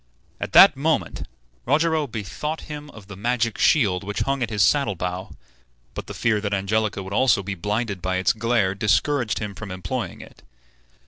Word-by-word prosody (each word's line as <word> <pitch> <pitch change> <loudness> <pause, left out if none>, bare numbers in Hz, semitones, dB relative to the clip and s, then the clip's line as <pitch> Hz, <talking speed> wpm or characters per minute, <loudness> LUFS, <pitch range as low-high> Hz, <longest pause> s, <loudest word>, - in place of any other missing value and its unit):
At - - -5
that - - +9
moment - - -1 0.4
Rogero 155 +2 +2
bethought 130 +8 -5
him 150 -1 -8
of 110 -7 -13
the 100 0 -10
magic 115 +2 -1
shield 100 -11 +3
which 105 +1 -3
hung 135 -1 -1
at 120 - -1
his 105 -3 +2
saddle 115 0 +2
bow; 90 +2 -4 0.6
but - - -7
the - - -7
fear 110 -3 +1
that 100 -1 -1
Angelica 100 +1 -1
would 95 +1 -7
also 115 -3 +3
be 100 +2 -4
blinded 105 +2 -3
by 95 +1 -1
its 95 +1 +2
glare 115 -4 +1
discouraged 115 +4 +1
him 105 -2 -4
from 105 +1 -8
employing 95 0 -4
it. - - -15
105 Hz, 180 wpm, -23 LUFS, 95-125 Hz, 0.6 s, that